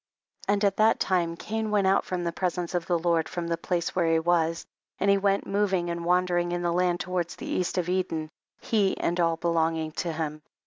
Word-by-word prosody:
33. 200 - +3
And 205 +1 0
at 195 -1 +1
that 220 +1 +4
time 175 -3 +1
Cain 220 +2 -3
went 205 -2 +2
out 190 +1 +3
from 180 -1 -3
the 170 - -1
presence 175 0 -2
of 175 -2 -1
the 175 - +2
Lord 165 -1 +1
from 175 -2 -4
the 170 0 0
place 170 0 -2
where 170 -3 +2
he 165 - +4
was, 165 0 +1 0.3
and 200 - +3
he 200 - +4
went 200 0 +1
moving 195 -3 0
andt 170 0 -3
wandering 175 0 +1
in 175 0 -2
the 170 -1 +1
land 175 0 +1
towards 180 -2 -2
the - - -8
east 185 0 -1
of 180 -2 0
Eden> 170 -4 -1 0.3
he 205 -4 +1
and 175 +1 -1
all 165 -1 +2
belonging 160 -1 0
to 170 +2 -3
him. 155 -1 -4
175 Hz, 225 wpm, -27 LUFS, 165-185 Hz, 0.3 s, that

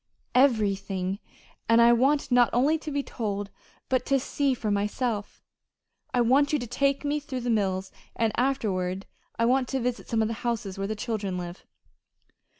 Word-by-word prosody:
"Everything. 200 -6 +2 0.5
And 230 0 +6
I 235 0 +7
want 275 +4 +2
not 245 -1 +5
only 285 +6 +3
to 310 - -6
be 285 -1 -1
told, 205 -5 -4 0.4
but 255 -1 +1
to 275 -1 +3
see 275 0 0
for 215 -3 -2
myself. 205 +1 -2 0.7
I 250 - +2
want 270 +5 +4
you 300 - +3
to 245 - -4
take 275 +4 0
me 290 +1 0
through 265 -3 -5
the 240 0 -1
mills, 190 -3 0 0.2
and 225 -1 +1
afterward 195 -8 -1 0.3
I 230 - +2
want 255 +1 +2
to 270 - -1
visit 250 0 -3
some 225 -2 +2
of - - 0
the 230 - -2
houses 220 -5 -2
where 195 - -1
the 215 - -2
children 205 -4 -3
live." 175 0 -7
235 Hz, 175 wpm, -27 LUFS, 205-265 Hz, 0.7 s, I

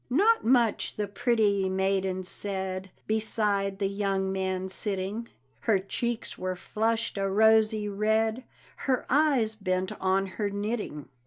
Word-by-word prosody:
Not 410 - +4
much 235 -2 +2
the 210 -1 -2
pretty 205 -3 +1
maiden 190 0 0
said, 190 0 -2 0.2
Beside 210 -3 0
the 200 -1 0
young 195 -1 -1
man 190 -1 -2
sitting; 200 +3 -3 0.3
Her 220 -4 +2
cheeks 230 +5 -3
were 185 0 -2
flushed 225 +3 -1
a 195 0 0
rosy 220 +1 +4
red, 220 +3 +1 0.4
Her 260 -2 +1
eyes 270 -6 +3
bent 185 -3 -1
on 190 +1 +2
her 200 +2 -3
knitting. 205 - -3
205 Hz, 130 wpm, -28 LUFS, 190-220 Hz, 0.4 s, Not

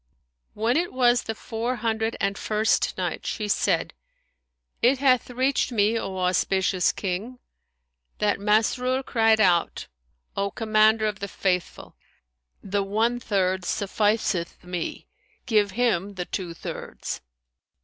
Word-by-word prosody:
When 230 +5 +1
it 350 +1 0
was 245 -1 +3
the 225 - -5
Four 230 +3 -3
Hundred 225 -1 -1
and 200 0 0
First 215 +2 0
Night, - - -3
She 210 -2 -2
said, 205 - +1 0.9
It 255 +3 +4
hath 255 -2 +3
reached 260 +2 0
me, 215 -1 +2
O 190 -3 -5
auspicious 185 0 +1
King, 205 +6 -4 0.8
that 210 -1 +1
Masrur 235 +5 +1
cried 225 -1 +3
out, 175 -5 +2 0.5
"O 200 0 0
Commander 220 0 +3
of 210 -1 -2
the 200 - -4
Faithful! 180 -3 -2 0.7
The 200 0 -1
one 220 +5 0
third 190 -4 0
sufficeth 205 -2 -1
me; 180 -1 -5 0.4
give 210 -3 +3
him 205 -5 +1
the 180 -1 -4
two 175 -3 -5
thirds." - - -6
215 Hz, 125 wpm, -25 LUFS, 195-230 Hz, 0.9 s, It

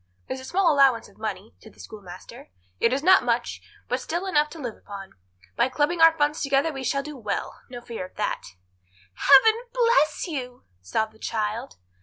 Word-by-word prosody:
"There's 260 - -4
a 260 - -10
small 355 +1 +2
allowance 270 -5 +4
of - - -24
money," 215 -1 -5
said 220 - -16
the - - -23
schoolmaster. 185 - -11 0.3
"It 230 - +3
is 275 +3 -1
not 375 +2 +6
much, - - -1 0.3
but - - -1
still 345 +4 -3
enough 300 -5 +2
to 330 - -11
live 245 -6 -5
upon. 195 -1 -10 0.4
By 235 +2 +2
clubbing 300 +6 0
our 325 0 +7
funds 295 0 +1
together 280 +3 +1
we 270 -1 -6
shall 275 +2 0
do 300 0 -8
well; 215 -6 -4
no 245 -1 -8
fear 235 -5 -6
of - - -29
that." 210 - -2 0.7
"Heaven 435 - +5
bless 475 -9 +2
you!" 255 -7 -6 0.2
sobbed 215 - -2
the 220 - -22
child. 220 +3 -3
270 Hz, 190 wpm, -25 LUFS, 220-310 Hz, 0.7 s, our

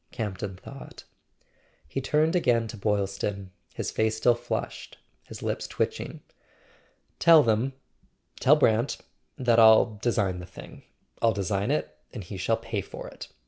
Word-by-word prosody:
Camp 105 -5 -4
ton 95 -3 -5
thought. 135 +8 -11 0.8
He 135 - -3
turned 155 +5 +2
again 120 -9 +2
to - - -7
Boylston, 100 -2 -2 0.2
his - - -3
face 110 0 0
still 120 +2 +4
flushed, 120 - -5 0.3
his - - -9
lips - - -2
twitching. - - -3 1.0
"Tell 165 -3 +7
them—tell 130 +4 -1
Brant—that 120 -1 0
I'll 110 -1 +6
design 100 -6 0
the 90 - -9
thing; 90 - -12 0.4
I'll 115 -1 +4
design 100 +1 -1
it, 75 0 -1 0.2
and 110 - -7
he 95 +2 -8
shall 110 +5 +1
pay 115 -3 -4
for - - -9
it. - - -10
110 Hz, 140 wpm, -27 LUFS, 100-120 Hz, 1.0 s, Tell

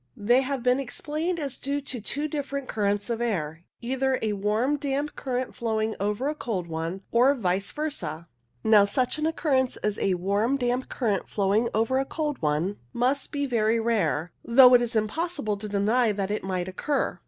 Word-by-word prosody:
They 240 +5 +3
have 270 -2 -3
been 250 +1 +3
explained 310 +6 -3
as 280 -4 -4
due 280 +1 -1
to 265 -4 -4
two 290 +8 -2
different 280 -2 -4
currents 205 -1 0
of 230 0 -2
air, 170 -8 -2 0.2
either 260 +2 0
a 215 -1 0
warm 215 +8 +1
damp 285 +1 -2
current 255 -1 -3
flowing 220 -1 -1
over 210 +6 -1
a 300 - 0
cold 225 - -3
one, 165 +3 -4
or 255 +4 +5
vice 195 -4 -1
versa. 275 - -4 0.4
Now, 215 -2 +6
such 250 +8 0
an 305 - +1
occurrence 275 -5 +1
as 210 -1 -2
a 190 -2 +1
warm 200 +8 +1
damp 250 0 -1
current 215 -7 -1
flowing 205 +3 +1
over 230 +4 +2
a 270 - 0
cold 300 -1 -3
one 155 +6 0 0.2
must 260 +3 0
be 285 -1 -1
very 230 -3 +1
rare, 180 -8 0
though 250 +1 +7
it 245 - +7
is 240 0 -2
impossible 220 +1 -1
to 210 +1 -6
deny 215 +4 +2
that 200 0 -2
it 210 - -2
might 185 -1 -2
occur. 275 +10 -1
235 Hz, 185 wpm, -26 LUFS, 200-270 Hz, 0.4 s, though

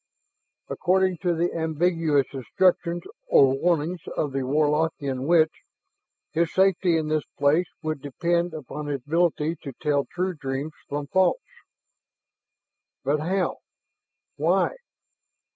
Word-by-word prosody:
According 185 -1 +1
to 175 0 0
the 170 +2 0
ambiguous 160 -3 +1
instructions 170 - +1 0.2
or 135 -1 +5
warnings 170 +3 0 0.2
of 145 - 0
the 135 - -1
Warlockian 145 -1 0
witch, 160 -2 +5 0.8
his 165 +1 +1
safety 190 -3 +3
in 155 -1 -1
this 155 0 +1 0.2
place 155 +5 +3 0.2
would 155 -3 -3
depend 170 +4 -1
upon 150 0 -6
his 140 -3 -2
ability 165 0 +1
to 140 -4 -7
tell 145 -2 +1
true 185 +1 -1
dreams 140 0 -4 0.2
from 145 0 -3
false. 185 - +3 1.7
But 145 +3 +1
how... 180 +4 -1 0.8
why? - - +2
160 Hz, 115 wpm, -25 LUFS, 145-175 Hz, 1.7 s, or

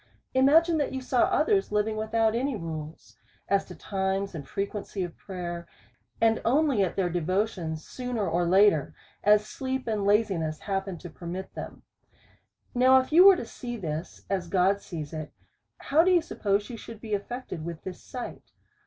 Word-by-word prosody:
Imagine 315 +5 +5
that 285 - -1
you 265 - -2
saw 255 -1 +2
others 400 - +2
living 210 +1 +1
without 220 +1 +1
any 260 +3 0
rules, 160 -4 -7 0.3
as 200 0 +2
to - - -10
times 195 0 -2
and 145 -5 -7
frequency 200 -1 -3
of 175 -2 -6
prayer, 175 -3 -6 0.5
and 225 0 +3
only 275 -2 +3
at 185 - -2
their 190 -2 +1
devotions 175 -1 -1
sooner 245 -5 -3
or 170 +1 +1
later, 190 -5 +4 0.3
as 210 +1 +5
sleep 260 +3 -4
and 215 -3 0
laziness 195 -7 +1
happens 195 -3 -3
to 175 - -8
permit 180 +3 -7
them. - - -8 0.9
Now 255 +1 +6
if 260 - -4
you 350 +4 +8
was 390 -2 +8
to - - -6
see 240 +1 -6
this, 160 -3 -5
as 185 -3 -2
God 195 +2 +2
sees 155 -4 -7
it, 155 -1 -5 0.5
how 310 +4 +3
do 365 - +3
you 355 -3 +4
suppose 205 -8 -1
you 235 - -6
should 225 0 -10
be 220 -1 -6
affected 205 -4 -4
with 170 -1 -6
this 185 - -7
sight? 250 -2 -8
200 Hz, 170 wpm, -27 LUFS, 175-245 Hz, 0.9 s, you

